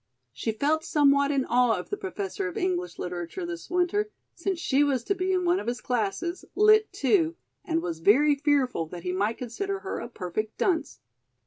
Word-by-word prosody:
She 225 - -2
felt 300 +8 0
somewhat 280 -1 +3
in 275 -2 +1
awe 240 -2 +3
of 180 - -7
the - - +1
Professor 395 0 -4
of 410 - -6
English 360 -2 -1
Literature 180 - -4
this 345 -1 -7
winter, 360 +4 +1 0.2
since 375 +1 -2
she 285 -3 +2
was 270 -4 +1
to 400 - +1
be 370 0 -1
in 365 -1 +1
one 350 +2 +3
of - - -7
his 245 +1 -1
classes, 250 - -2
Lit. 430 +1 +5
II, 335 -4 +3 0.3
and 330 -1 -1
was 165 -2 -3
very 270 - +5
fearful 275 - +1
that 170 +1 -9
he 180 - -2
might 205 +4 0
consider 390 - -4
her 385 - -4
a 235 - -6
perfect 215 0 -4
dunce. 345 -4 0
295 Hz, 195 wpm, -27 LUFS, 235-370 Hz, 0.3 s, Lit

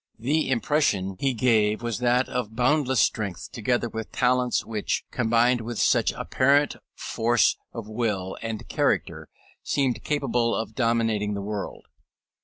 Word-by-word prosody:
The 140 +6 0
impression 115 -8 +1
he 135 -2 0
gave 110 -2 +2
was 120 -2 -2
that 125 +1 +2
of 115 -4 -4
boundless 130 +1 +2
strength, 100 -5 -1
together 120 +1 0
with 110 -1 -6
talents 125 0 +1
which, 110 -2 -2
combined 120 +1 +2
with 115 0 -5
such - - +3
apparent 140 +3 +2 0.2
force 115 -1 +1 0.2
of 115 -3 -7
will 110 -4 -2
and 115 -2 -5
character, - - -1 0.3
seemed 135 -4 -1
capable 120 -5 0
of 110 0 -4
dominating 115 -3 0
the 100 - -4
world. 105 -1 -5
115 Hz, 135 wpm, -25 LUFS, 110-125 Hz, 0.3 s, such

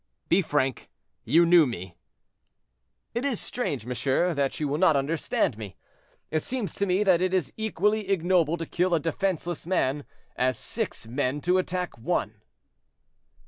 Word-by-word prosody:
"Be 180 +3 +5
frank; 135 -6 -1 0.4
you 165 +9 +5
knew 170 -3 +6
me?" 95 -6 -6 1.2
"It 235 +2 -2
is 275 -6 -1
strange, 145 - -3
monsieur, 130 +8 0
that 140 -2 -1
you 150 - 0
will 145 +2 -1
not 165 -4 +5
understand 140 -5 0
me. 100 -5 -7 0.6
It 155 - +1
seems 235 -6 -3
to 200 - -1
me 185 +3 +2
that 185 -4 +4
it 185 0 +1
is 160 -8 -1
equally 210 -1 0
ignoble 175 -3 +2
to 165 - -4
kill 180 +2 +1
a - - +2
defenseless 170 0 -2
man, 145 -6 0 0.3
as 130 0 +1
six 220 - -4
men 130 +4 -1
to 180 +3 +2
attack 180 -1 -3
one." 110 - -2
165 Hz, 155 wpm, -26 LUFS, 135-185 Hz, 1.2 s, knew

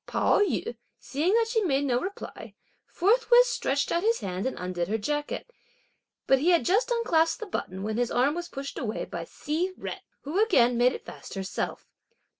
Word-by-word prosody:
Pao - - +2
yü, 365 - 0 0.2
seeing 320 +9 0
that 460 -1 +3
she 455 -1 +1
made 285 -7 +1
no 245 -3 +2
reply, 395 +2 -7 0.3
forthwith 480 +5 +4
stretched 280 - -1
out 340 - +1
his 455 +3 +1
hand 185 +3 -3
and 260 - -4
undid 180 -1 -3
her 215 +3 0
jacket; 295 - -3 0.7
but 270 - +4
he 320 +6 +2
had 345 -2 +4
just 415 +7 +2
unclasped 345 -8 +2
the 445 - -5
button, 190 - -4
when 215 +1 -2
his 245 -1 +1
arm 260 +4 +2
was 345 +1 -5
pushed 275 0 -6
away 220 -3 -3
by 170 -1 -6
Hsi 330 - -2
Jen, - - -5 0.2
who 340 +9 +1
again 245 - +4
made 245 +2 +4
it - - -8
fast - - -10
herself. 190 0 -4
295 Hz, 190 wpm, -27 LUFS, 240-395 Hz, 0.7 s, forthwith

